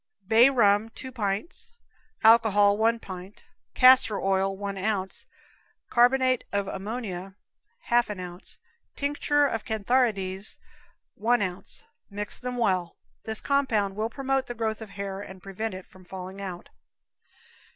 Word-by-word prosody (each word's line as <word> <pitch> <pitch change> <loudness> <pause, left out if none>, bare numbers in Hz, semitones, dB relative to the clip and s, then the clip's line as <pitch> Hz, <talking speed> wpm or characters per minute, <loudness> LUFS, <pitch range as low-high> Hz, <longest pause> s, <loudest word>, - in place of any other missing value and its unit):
Bay 230 +4 +7
rum, 215 -4 +3
two 260 +3 -9
pints; 220 - -3 0.5
alcohol, 215 -3 +6
one 225 +2 +2
pint; 185 -1 -10 0.3
castor 255 -5 +6
oil, 195 0 0
one 200 0 -4
ounce; 195 -1 -2 0.6
carb. 255 +1 +4
ammonia, 195 -1 -4 0.5
half 240 - +2
an 205 -3 -5
ounce; 180 0 -5 0.4
tincture 290 0 +1
of 225 -6 -2
cantharides, 215 -3 0 0.6
one 235 +1 +1
ounce. 185 - -6 0.2
Mix 205 0 -4
them 250 0 -4
well. 185 -7 0 0.3
This 220 -1 -3
compound 230 -9 +1
will 215 +2 -1
promote 270 +1 -1
the 240 - -5
growth 220 -1 -2
of 220 - -7
the - - -15
hair 200 -1 -4
and 190 -2 -10
prevent 195 +3 -5
it 185 - -9
from 185 - -18
falling 190 +1 -8
out. 180 -3 -7
210 Hz, 130 wpm, -26 LUFS, 195-240 Hz, 0.6 s, Bay